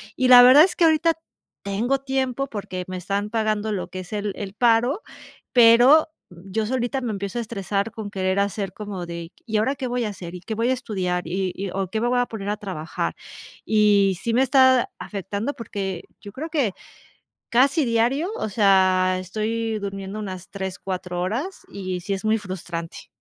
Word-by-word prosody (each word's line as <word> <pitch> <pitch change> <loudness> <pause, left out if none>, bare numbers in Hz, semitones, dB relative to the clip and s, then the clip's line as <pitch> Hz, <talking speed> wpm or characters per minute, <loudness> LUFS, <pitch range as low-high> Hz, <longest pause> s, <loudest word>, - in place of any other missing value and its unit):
Y 255 -1 +1
la 250 -1 +11
verdad 260 +5 +9
es 375 - +1
que 335 - +4
ahorita 325 +1 +4 0.5
tengo 230 +7 0
tiempo 265 0 -1
porque 185 -6 -5
me 185 0 -5
están 200 +3 -2
pagando 215 -1 0
lo 190 -3 -3
que 185 - -6
es 185 +3 -9
el 205 -1 -2
el 200 -2 -6
paro. 240 - +2 0.5
Pero 245 +6 +7 0.2
yo 190 +5 -4
solita 250 +2 -1
me 240 -3 -2
empiezo 200 +2 -4
a - - 0
estresar 205 -1 -2
con 215 -2 -7
querer 190 0 0
hacer 200 -1 -1
como 200 -4 -6
de: 170 0 -7
"Y, 220 -2 -1
¿ahora 260 +7 +1
qué 265 -1 -4
voy 245 0 -1
a - - -2
hacer? 180 -3 -8
y 180 - -8
¿qué 220 +4 -5
voy 230 +3 +1
a - - +3
estudiar? 185 -8 -2
y 185 +2 -2
-y 195 -1 -4
o 195 -1 -2
¿qué 220 +2 -2
me 240 - +1
voy 250 0 +2
a 245 - +2
poner 205 -3 -5
a 210 - -1
trabajar?", 185 -6 -4 0.5
y 205 -3 +3
sí 230 - -1
me 245 - +4
está 260 -1 +4
afectando 200 +6 -4
porque 195 -7 -5 0.2
yo 200 - -9
creo 310 +7 -5
que 280 - 0 0.8
casi 275 +6 +3
diario. 240 +8 +1
O - - -2
sea, 185 -2 +3
estoy 220 +4 -2
durmiendo 195 0 -5
unas 185 -4 -7
3 190 -2 -5
4 180 -2 -4
horas 250 - -3
y 185 -2 -4
sí, 200 +3 -3
es 195 +2 -4
muy 220 +1 +3
frustrante. 175 -4 -7
210 Hz, 195 wpm, -23 LUFS, 190-245 Hz, 0.8 s, la